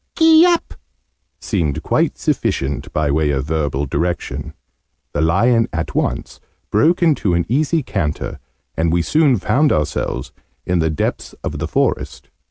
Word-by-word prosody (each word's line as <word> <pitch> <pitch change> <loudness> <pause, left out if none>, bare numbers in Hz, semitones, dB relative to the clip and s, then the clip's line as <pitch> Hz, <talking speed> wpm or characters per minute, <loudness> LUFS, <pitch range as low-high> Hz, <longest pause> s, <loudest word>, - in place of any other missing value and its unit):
"Gee 325 +1 +7
up!', 345 -1 0 0.7
seemed 80 - -2
quite - - +1
sufficient 70 +1 -1
by 75 -2 0
way 75 +1 +1
of 70 -1 -1
verbal 75 -2 -1
direction: 85 +5 -3 0.6
the 75 - 0
lion 115 +9 +3
at - - -3
once - - -2 0.3
broke 165 - +3
into 135 - +2
an 85 0 +1
easy 150 +5 +1
canter, 85 -11 -3 0.4
and 80 0 +1
we 85 0 +2
soon 150 - +3
found 130 +10 +2
ourselves 75 -4 -2 0.3
in 90 -1 +1
the 80 0 +1
depths 75 - -3
of - - -4
the - - -2
forest. - - -2
85 Hz, 145 wpm, -19 LUFS, -, 0.7 s, Gee